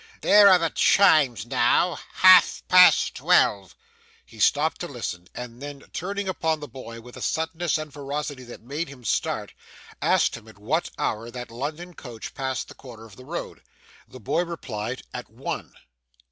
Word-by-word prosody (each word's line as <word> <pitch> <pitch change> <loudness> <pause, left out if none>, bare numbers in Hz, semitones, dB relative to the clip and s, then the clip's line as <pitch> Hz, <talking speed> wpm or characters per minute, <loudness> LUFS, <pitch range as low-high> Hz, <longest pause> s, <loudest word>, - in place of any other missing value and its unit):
There 205 -1 +7
are 185 - +7
the 165 -3 -1
chimes 150 - +4
now, 125 +8 +2
half 185 -1 +6
past 180 0 +6
twelve.' 100 -2 +2 0.5
He - - -16
stopped - - +2
to - - -3
listen, 90 0 -6
and 125 0 -8
then 145 -1 -8
turning 200 +3 -4
upon 160 -4 -1
the 145 - -8
boy 115 -2 -10
with 125 +1 -13
a - - -9
suddenness 160 +1 -1
and 155 -2 -7
ferocity 145 -1 -5
that 120 - -11
made 145 +6 -4
him 135 -3 -13
start, 110 - -2 0.5
asked - - +2
at 110 -1 -15
what 150 +12 -1
hour 115 +2 -2
that 125 -1 -8
London 155 +9 -6
coach 120 -7 -9
passed 130 -2 -3
the - - -12
corner 115 -4 -13
of 105 -3 -15
the 130 - -14
road. 170 +5 -6 0.5
The 130 - -13
boy 160 - 0
replied, 130 -8 -6
at - - -7
one. - - -6
140 Hz, 165 wpm, -24 LUFS, 120-165 Hz, 0.5 s, There